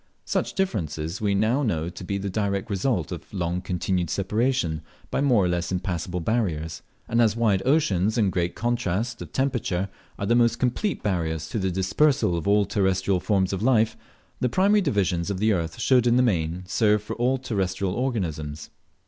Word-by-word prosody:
Such -, -, -1 dB
difference 105 Hz, -, -1 dB, 0.2 s
we 100 Hz, -2 st, +1 dB
now 110 Hz, +7 st, +2 dB
know 85 Hz, -, 0 dB
to 90 Hz, -, -8 dB
be 100 Hz, +2 st, -2 dB
the 100 Hz, 0 st, -4 dB
direct 100 Hz, +2 st, -1 dB
result 100 Hz, -, 0 dB
of -, -, -7 dB
long 90 Hz, -2 st, -2 dB
continued 90 Hz, -1 st, -1 dB
separation 100 Hz, -, 0 dB, 0.3 s
by -, -, 0 dB
more 120 Hz, -9 st, +4 dB
or -, -, +2 dB
less 90 Hz, 0 st, -1 dB
impassable 90 Hz, -1 st, -2 dB
barriers; 80 Hz, -7 st, -1 dB, 0.3 s
and 115 Hz, +1 st, +2 dB
as 110 Hz, -2 st, +3 dB
wide 110 Hz, -5 st, +2 dB
oceans 110 Hz, -, +2 dB
and 105 Hz, -4 st, +3 dB
great 90 Hz, -1 st, -1 dB
contrast: 120 Hz, -1 st, -1 dB
of -, -, -8 dB
temperature 115 Hz, -9 st, -1 dB, 0.3 s
are 100 Hz, -, -3 dB
the 115 Hz, -, +2 dB
most 120 Hz, -1 st, +3 dB
complete 135 Hz, -, -1 dB
barriers 80 Hz, -5 st, -1 dB
to 110 Hz, -, -2 dB
the 95 Hz, -1 st, 0 dB
dispersal 95 Hz, -, +2 dB
of 85 Hz, +2 st, -3 dB
all 100 Hz, 0 st, +4 dB
terrestrial 95 Hz, -1 st, +1 dB
forms 95 Hz, -1 st, +1 dB
of 95 Hz, -, -2 dB
life, 115 Hz, -2 st, +3 dB, 0.4 s
the 125 Hz, -, +1 dB
primary 200 Hz, -, +3 dB
divisions 95 Hz, -, 0 dB
of 100 Hz, -, -2 dB
the 110 Hz, +3 st, +2 dB
earth 85 Hz, -3 st, -3 dB
should 125 Hz, -2 st, +3 dB
in 120 Hz, -, +4 dB
the 125 Hz, -, +4 dB
main 90 Hz, -5 st, 0 dB
serve 105 Hz, +1 st, +2 dB
for 110 Hz, +2 st, -5 dB
all 125 Hz, +3 st, +2 dB
terrestrial 95 Hz, -6 st, -2 dB
organisms. 80 Hz, -, -3 dB
100 Hz, 180 wpm, -25 LUFS, 90-120 Hz, 0.4 s, more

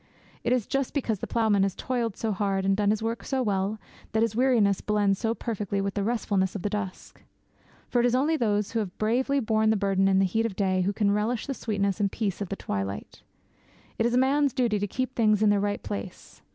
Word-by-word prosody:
It -, -, 0 dB
is 250 Hz, -4 st, +2 dB
just 275 Hz, 0 st, -2 dB
because 225 Hz, -8 st, -1 dB
the -, -, -4 dB
ploughman 220 Hz, -4 st, +2 dB
has 195 Hz, -1 st, +1 dB
toiled 235 Hz, -5 st, -2 dB
so 225 Hz, -, -1 dB
hard, 195 Hz, -1 st, -1 dB
and 195 Hz, 0 st, +3 dB
done 205 Hz, 0 st, +1 dB
his 215 Hz, +1 st, 0 dB
work 230 Hz, +1 st, -2 dB
so 265 Hz, -2 st, -1 dB
well, 200 Hz, 0 st, -1 dB, 0.3 s
that 220 Hz, 0 st, +3 dB
his 225 Hz, -2 st, -1 dB
weariness 230 Hz, -6 st, +3 dB
blends 205 Hz, -2 st, +1 dB
so 225 Hz, -1 st, 0 dB
perfectly 210 Hz, -4 st, -3 dB
with 195 Hz, 0 st, -1 dB
the 205 Hz, -, -1 dB
restfulness 205 Hz, -4 st, 0 dB
of 200 Hz, -, -4 dB
the 205 Hz, -, -1 dB
dusk. 200 Hz, -3 st, -5 dB, 0.7 s
For 245 Hz, -, +1 dB
it 240 Hz, -, +4 dB
is 245 Hz, -, +1 dB
only 295 Hz, +5 st, +2 dB
those 210 Hz, -7 st, 0 dB
who 230 Hz, -, 0 dB
have 195 Hz, -5 st, -4 dB
bravely 255 Hz, +6 st, +1 dB
borne 220 Hz, -2 st, +2 dB
the 220 Hz, -, +3 dB
burden 195 Hz, -1 st, +2 dB
and 195 Hz, 0 st, +4 dB
heat 225 Hz, +5 st, +1 dB
of 215 Hz, -, -7 dB
the 200 Hz, -, -1 dB
day 185 Hz, -1 st, +1 dB
who 190 Hz, +2 st, +1 dB
can 205 Hz, -1 st, +1 dB
relish 215 Hz, +3 st, 0 dB
the 275 Hz, -, -3 dB
sweetness 200 Hz, -5 st, -1 dB
and 200 Hz, -2 st, +1 dB
peace 205 Hz, -4 st, -2 dB
of 200 Hz, -, -3 dB
the 195 Hz, -, -2 dB
twilight. 100 Hz, -, -5 dB, 0.8 s
It 225 Hz, -, +3 dB
is 240 Hz, -, 0 dB
a -, -, +4 dB
man's 275 Hz, +2 st, +3 dB
duty 240 Hz, -6 st, +1 dB
to 205 Hz, -, -1 dB
keep 255 Hz, +5 st, -3 dB
things 215 Hz, -3 st, +3 dB
in 210 Hz, -, +5 dB
their 205 Hz, -, +3 dB
right 205 Hz, 0 st, -2 dB
place. 100 Hz, 0 st, -7 dB
210 Hz, 240 wpm, -27 LUFS, 195-235 Hz, 0.8 s, in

